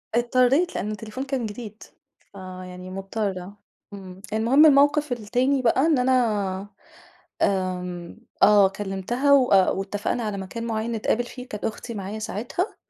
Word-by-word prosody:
اضطريت 255 +8 +2
لأن 210 - -2
التليفون 215 +4 -6
كان 265 -4 -2
جديد، 215 0 -8 0.5
فيعني 185 -1 -9
مضطرة، 195 0 -4 0.4
امم. 190 -1 -10
المهم 245 +8 +5
الموقف 290 0 +4
التاني 245 +4 0
بقى 250 +2 +3
إن 320 -3 +3
أنا 210 -7 +1 0.7
آمم 180 -2 -2 0.3
آه 205 -1 +7
كلمتها 205 +8 0
وأ 245 -9 +5
واتفقنا 205 +4 -2
على 210 -2 -3
مكان 215 +5 -6
معين 225 0 -2
نتقابل 230 +1 0
فيه 250 +1 -10
كانت 210 - -5
أختي 230 +2 -5
معايا 205 +1 -5
ساعتها، 235 - -3
215 Hz, 130 wpm, -24 LUFS, 195-250 Hz, 0.7 s, آه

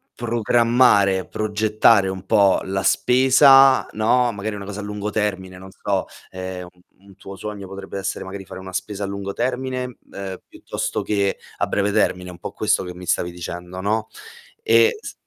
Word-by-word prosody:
programmare, 115 -4 +3
progettare 105 -1 +2
un 95 0 -6
po' 100 -2 +4
la 95 0 -2
spesa, 135 +4 +5
no, 120 +3 +2
magari 105 +1 -4
una 100 -1 -7
cosa 100 +1 -7
a - - -5
lungo 105 0 -4
termine, 95 -4 -2
non 95 - -11
so, 100 -2 -2 0.3
ehm, 95 -1 -6
un 90 0 -27 0.2
un 100 -1 -18
tuo 95 0 -10
sogno 105 -1 -7
potrebbe 95 0 -7
essere 95 0 -4
magari 95 +1 -7
fare 95 - -10
una 95 0 -9
spesa 100 +2 -4
a - - -2
lungo 100 0 -5
termine, 125 +1 -3
ehm, 95 -2 -6
piuttosto - - -4
che 100 -2 0 0.2
a - - 0
breve 100 0 0
termine, 90 -2 0
un 90 - -13
po' - - -6
questo - - 0
che 90 -1 -7
mi 90 - -10
stavi 90 0 0
dicendo, 90 +1 -7
no? 110 +2 -1 0.6
E 115 - +4
s - - -8
100 Hz, 175 wpm, -21 LUFS, 95-110 Hz, 0.6 s, spesa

